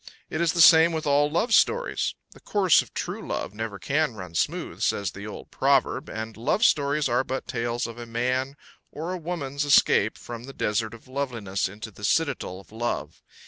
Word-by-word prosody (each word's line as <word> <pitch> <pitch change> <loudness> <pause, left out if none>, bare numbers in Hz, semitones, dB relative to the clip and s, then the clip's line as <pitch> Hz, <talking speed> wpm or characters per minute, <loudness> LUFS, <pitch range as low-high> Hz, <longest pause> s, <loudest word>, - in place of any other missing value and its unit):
It 155 - -1
is 170 -1 +2
the 170 - +2
same 160 +2 +8
with 160 -1 -3
all 145 0 +3
love 220 +10 0
stories. - - +2 0.2
"The - - -16
course 190 -6 +3
of - - -12
true - - -4
love - - -3
never 110 -1 -5
can 145 +4 0
run 90 -5 -8
smooth," - - -2
says 100 -1 0
the 100 +2 -8
old 105 - -9
proverb, 135 -1 +1
and 110 0 -5
love 155 - +1
stories 145 - +2
are 125 +2 +1
but 130 0 -4
tales 120 -1 -2
of 115 0 -7
a 120 - -7
man 125 +4 -1 0.4
or 165 +5 -4
a - - -3
woman's 145 -5 -3
escape 145 -1 +4
from 120 0 -8
the 135 - -9
desert 110 0 -1
of 115 - -17
lovelessness 120 -9 -2
into 110 +3 -9
the 105 - -14
citadel 145 - 0
of 100 - -17
love. 120 +2 -4
130 Hz, 195 wpm, -26 LUFS, 110-150 Hz, 0.4 s, same